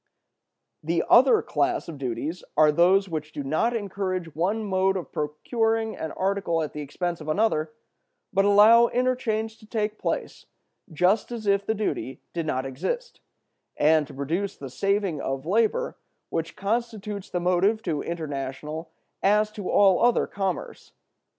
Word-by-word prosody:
"The 165 +2 0
other 270 - +6
class 350 -1 0
of 160 -4 -8
duties 140 +7 -4
are 155 -1 +6
those 185 +5 +4
which 155 -3 -5
do 145 - -5
not 160 - 0
encourage 185 -5 -3
one 200 +7 0
mode 190 0 +1
of 180 - -7
procuring 225 +9 -1
an 160 - -5
article 190 -4 0
at 150 - -5
the 150 - -5
expense 170 +4 -3
of 155 - -7
another, 155 -4 +1 0.6
but 195 0 +3
allow 215 +4 +7
interchange 230 -4 -1
to 215 - -16
take 215 -1 -2
place - - -3 0.4
just 180 +9 +2
as 230 -3 -5
if 200 0 +2
the 220 - +1
duty 200 -10 -3
did 165 -2 -3
not 130 -2 -1
exist, 480 - -4 0.6
and 155 0 +4
to - - -12
produce 170 +9 -2
the 135 -2 -8
saving 195 -2 0
of 135 +1 -3
labor 225 - +1 0.3
which 165 0 -3
constitutes 210 -1 -3
the 180 - -2
motive 185 +5 +2
to 160 -7 -1
international 150 0 -5 0.3
as 210 +2 +3
to 205 -3 -6
all 195 -2 +5
other 240 0 +4
commerce. 195 -3 -4
190 Hz, 150 wpm, -25 LUFS, 155-215 Hz, 0.6 s, allow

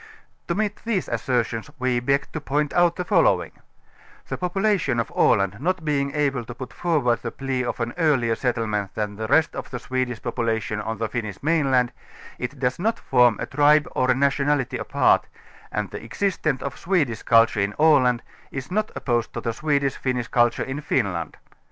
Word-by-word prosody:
To 170 - -1
meet 210 0 -1
these 220 -6 -1
assertions 120 0 -1
we 125 -2 +1
beg 140 +3 0
to 155 - -5
point 145 +1 -1
out 175 -1 +3
the 180 - -3
follow - - +3
ing: - - -12 0.8
The - - -2
population 185 - 0
of 115 - -2
Aland 100 0 +3
not 180 +1 -1
being 140 -2 0
able 140 -4 0
to 120 - -8
put 125 -1 -8
forward 145 -9 +1
the 115 - -3
plea 130 0 -3
of 125 - -3
an 120 0 -2
earlier 135 -8 +3
settlement 110 -5 -2
than 105 -1 -2
the 110 +1 -4
rest 160 +6 +3
of - - -6
the 125 - -4
Swe 130 +1 -1
dish 120 -3 -6
population 115 -3 -2
on 110 +1 -4
the 115 +1 -1
Finnish 110 -3 -5
mainland, 135 -6 +2 0.5
it 125 +3 -4
does 125 +1 -1
not 225 +5 0
form 125 -4 +3
a - - -2
tribe 150 +1 +4
or 130 0 +2
nationality 140 0 +1
apart, - - +2 0.4
and 105 -2 -3
the - - -7
existance 155 +1 -1
of 140 - -5
Swedish 150 - 0
cul 115 -1 +6
ture 105 -3 -3
in 100 +1 -1
Aland 135 -6 +4 0.3
is 135 +3 -6
not 215 +3 0
opposed 120 -3 -1
to - - -3
the 115 - -2
Swedish 140 0 0
Finnish 125 -3 -2
culture 120 -1 +2
in 135 +3 -5
Finland. 90 - -1
130 Hz, 190 wpm, -23 LUFS, 115-150 Hz, 0.8 s, cul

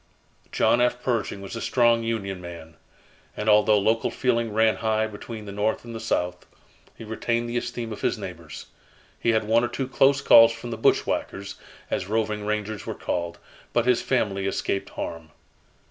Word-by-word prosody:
John 120 - +3
F. 125 0 +2
Pershing 115 -5 -1
was 100 +3 -7
a 115 - -5
strong 120 -2 +3
Union 100 -5 -3
man, 85 -2 -10 0.6
and 105 - -3
although 105 0 +5
local 110 +3 +1
feeling 115 -3 0
ran 110 -1 +3
high 110 +1 +1
between 110 +1 -8
the 100 - -7
North 105 +4 -1
and 115 - -8
the 115 - -5
South, 90 -5 -2 0.5
he - - -9
retained 115 +2 -2
the 120 - -5
esteem 120 -2 -3
of - - -9
his - - 0
neighbors. 85 -6 -8 0.5
He - - 0
had 110 -1 +3
one 115 +2 +3
or - - +1
two 130 +2 -3
close 135 +1 +3
calls 115 -4 +8
from 115 +1 -8
the - - -2
"bushwhackers," 100 -2 0 0.4
as 90 - -1
roving 105 -1 -1
rangers 105 -1 -3
were - - -3
called, 85 -1 -3 0.4
but 120 - +2
his 125 -1 +3
family 100 -7 0
escaped 95 0 -2
harm. 80 -1 -6
110 Hz, 175 wpm, -25 LUFS, 100-115 Hz, 0.6 s, calls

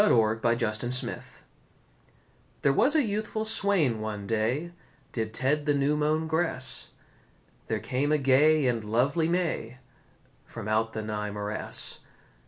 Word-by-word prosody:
THE 210 - +4
ELF 110 -1 +3
BRIDE 120 +2 -1 1.4
There 140 - +4
was 280 - +3
a 305 - +4
youthful 215 0 -2
swain 200 - +2
one 105 -2 -4
day 115 +10 -1 0.4
Did 110 -2 -3
ted 145 +6 0
the 145 - +3
new 140 +1 +2
mown 155 +1 +1
grass; 160 -5 0 0.8
There 110 - 0
came 130 +7 -1
a 155 - +4
gay 145 +2 +4
and 120 -3 0
lovely 135 +9 +1
may 165 -9 -1 0.7
From - - -8
out 110 +1 +1
the 110 - -4
nigh 105 -1 -3
morass. 105 +1 -2
130 Hz, 135 wpm, -28 LUFS, 110-155 Hz, 1.4 s, THE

